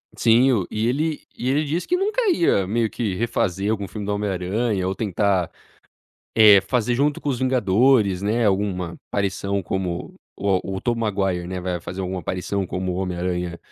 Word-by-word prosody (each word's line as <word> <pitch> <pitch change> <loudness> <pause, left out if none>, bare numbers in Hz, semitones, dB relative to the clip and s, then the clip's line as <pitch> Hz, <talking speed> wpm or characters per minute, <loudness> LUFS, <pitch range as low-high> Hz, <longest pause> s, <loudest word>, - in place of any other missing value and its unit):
Sim, 120 +4 +4
o 100 -8 0
e 110 +1 -1
ele 150 +5 -1
e 125 - -2
ele 145 +3 +1
disse 160 +5 -2
que 360 - +2
nunca 410 +6 0
ia 165 - +2
meio 115 +3 +1
que 105 -5 -2
refazer 100 -2 0
algum 100 -3 -2
filme 105 +3 -6
do 105 - -1
Homem 105 0 -1
Aranha 95 +2 -1
ou 95 - 0
tentar, 100 -3 0 0.8
eh, 105 -3 +8
fazer 120 +1 0
junto 145 +3 +1
com 145 - -2
os 125 -3 -1
Vingadores, 115 -4 +3
né, 110 +3 +1
alguma 95 -4 -1
aparição 100 0 -1
como 90 -1 -3 0.2
o 95 -1 0
o 95 - -5
Tobey 120 -1 -1
Maguire, 95 -5 -1
né, 95 0 -4
vai 90 -1 -2
fazer 90 +3 -6
alguma 95 0 -3
aparição 95 +3 -2
como 90 +1 -3
o - - -3
Homem 90 -1 -3
Aranha 90 -1 -2
100 Hz, 190 wpm, -22 LUFS, 95-120 Hz, 0.8 s, eh